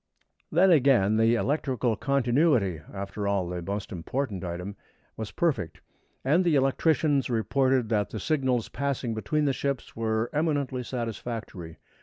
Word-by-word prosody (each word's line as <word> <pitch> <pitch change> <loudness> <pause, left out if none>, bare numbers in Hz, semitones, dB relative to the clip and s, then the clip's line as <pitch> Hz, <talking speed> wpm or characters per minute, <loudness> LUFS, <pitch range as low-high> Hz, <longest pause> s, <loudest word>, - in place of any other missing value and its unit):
Then 180 +4 +5
again, 125 - +4
the 115 +1 +4
electrical 130 -3 0
continuity 125 - +2
after 100 +1 -4
all, 100 -3 0
the 90 0 -4
most 100 +3 -4
important 100 +3 -3
item 90 +3 -5 0.4
was 110 -2 -5
perfect, 145 - -1 0.5
and 160 +7 +4
the 170 -4 +2
electricians 140 +1 +2
reported 125 +1 +1
that 105 -3 +1
the 110 - -5
signals 130 -2 0
passing 135 -4 -2
between 150 +7 -1
the 140 - +2
ships 140 -2 -3
were 110 0 -1
eminently 145 -4 0
satisfactory. 115 -8 -5
120 Hz, 135 wpm, -27 LUFS, 105-140 Hz, 0.5 s, Then